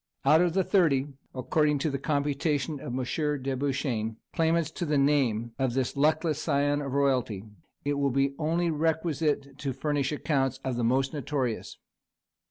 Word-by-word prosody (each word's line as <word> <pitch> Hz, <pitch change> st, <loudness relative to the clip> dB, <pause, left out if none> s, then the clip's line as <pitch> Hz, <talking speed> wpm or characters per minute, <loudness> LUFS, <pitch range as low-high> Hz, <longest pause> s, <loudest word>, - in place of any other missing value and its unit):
Out 160 Hz, +2 st, +6 dB
of 175 Hz, -2 st, +2 dB
the 190 Hz, +1 st, +2 dB
thirty, 150 Hz, -9 st, +2 dB, 0.3 s
according 150 Hz, +3 st, +1 dB
to 145 Hz, +2 st, -1 dB
the 140 Hz, -, -2 dB
computation 145 Hz, 0 st, -1 dB
of -, -, -8 dB
M. 145 Hz, +2 st, -1 dB
de 135 Hz, 0 st, -1 dB
Beauchesne, 130 Hz, -5 st, -2 dB, 0.2 s
claimants 165 Hz, -1 st, +1 dB
to 175 Hz, -, -5 dB
the 150 Hz, -3 st, +1 dB
name 130 Hz, -5 st, +2 dB
of 130 Hz, -2 st, 0 dB
this 130 Hz, 0 st, 0 dB
luckless 155 Hz, +1 st, +1 dB
scion 145 Hz, -1 st, +1 dB
of 140 Hz, -2 st, -4 dB
royalty, 130 Hz, -8 st, +1 dB, 0.4 s
it 145 Hz, 0 st, 0 dB
will 140 Hz, -1 st, +2 dB
be 135 Hz, +1 st, +1 dB
only 165 Hz, +2 st, +1 dB
requisite 155 Hz, -3 st, -1 dB
to 135 Hz, -3 st, -2 dB
furnish 140 Hz, +1 st, -1 dB
accounts 135 Hz, -3 st, 0 dB
of 130 Hz, -2 st, -2 dB
the 120 Hz, -, -1 dB
most 130 Hz, +4 st, +1 dB
notorious. 135 Hz, -5 st, -3 dB
140 Hz, 165 wpm, -28 LUFS, 135-155 Hz, 0.4 s, Out